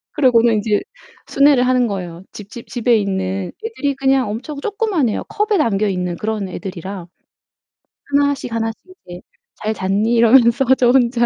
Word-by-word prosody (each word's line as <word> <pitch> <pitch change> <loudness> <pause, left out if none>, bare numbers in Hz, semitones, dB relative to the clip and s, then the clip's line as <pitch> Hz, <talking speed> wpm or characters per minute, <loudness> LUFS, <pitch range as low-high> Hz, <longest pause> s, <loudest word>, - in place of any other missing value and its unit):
그러고는 240 -5 +4
인제 210 0 +1 0.5
순회를 275 -3 +3
하는 250 -2 +2
거예요. 180 -3 -6
집 205 -1 -11
집 235 -1 -10
집에 240 -1 +1
있는 190 -2 -2
얘들이 285 -11 -2
그냥 270 -4 +1
엄청 280 +7 -6
조그만해요. 405 - -1
컵에 420 -1 0
담겨 215 -7 +1
있는 180 -2 -2
그런 210 0 -3
애들이라. 185 0 -7 1.0
하나씩 285 -3 0
하나씩 225 -1 -2 0.3
이제 175 0 -9 0.3
"잘 215 +1 -3
잤니?" 205 +4 0
이러면서 235 +2 +4
저 245 -1 +4
혼자. 240 -2 +2
230 Hz, 330 characters per minute, -18 LUFS, 200-265 Hz, 1.0 s, 그러고는